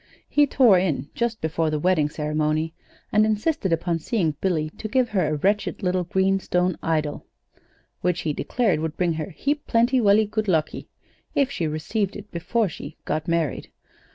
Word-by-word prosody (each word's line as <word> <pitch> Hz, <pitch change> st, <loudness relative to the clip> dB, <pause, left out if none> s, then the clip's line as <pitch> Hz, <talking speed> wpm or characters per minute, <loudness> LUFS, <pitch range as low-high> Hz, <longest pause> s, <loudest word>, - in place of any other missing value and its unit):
He 290 Hz, -1 st, +3 dB
tore 240 Hz, -9 st, +5 dB
in 155 Hz, -6 st, -1 dB
just 235 Hz, -2 st, -2 dB
before 160 Hz, 0 st, 0 dB
the 155 Hz, -, 0 dB
wedding 155 Hz, -2 st, +2 dB
ceremony, 155 Hz, +1 st, -1 dB, 0.4 s
and 215 Hz, 0 st, +4 dB
insisted 215 Hz, -, 0 dB
upon 165 Hz, 0 st, 0 dB
seeing 165 Hz, -3 st, 0 dB
Billy 160 Hz, -5 st, 0 dB
to 215 Hz, -, -3 dB
give 250 Hz, +1 st, +1 dB
her 185 Hz, -6 st, +1 dB
a 155 Hz, -, 0 dB
wretched 200 Hz, +6 st, 0 dB
little 180 Hz, -1 st, +1 dB
green 190 Hz, +2 st, +2 dB
stone 180 Hz, -1 st, 0 dB
idol, 155 Hz, -2 st, -1 dB, 0.7 s
which 180 Hz, -1 st, 0 dB
he 155 Hz, -, -1 dB
declared 215 Hz, -, 0 dB
would 160 Hz, 0 st, -3 dB
bring 175 Hz, -2 st, +1 dB
her 160 Hz, +4 st, -4 dB
'heap 285 Hz, -, -2 dB
plenty 240 Hz, +3 st, +3 dB
velly 215 Hz, -1 st, +5 dB
good 215 Hz, +1 st, -2 dB
luckee' 160 Hz, -5 st, 0 dB, 0.5 s
if 275 Hz, -1 st, +2 dB
she 170 Hz, -, -1 dB
received 190 Hz, +7 st, -2 dB
it 205 Hz, 0 st, -10 dB
before 200 Hz, +6 st, 0 dB
she 150 Hz, -2 st, -9 dB
'got 155 Hz, 0 st, -2 dB
married.' 165 Hz, -5 st, -1 dB
180 Hz, 175 wpm, -24 LUFS, 155-215 Hz, 0.7 s, tore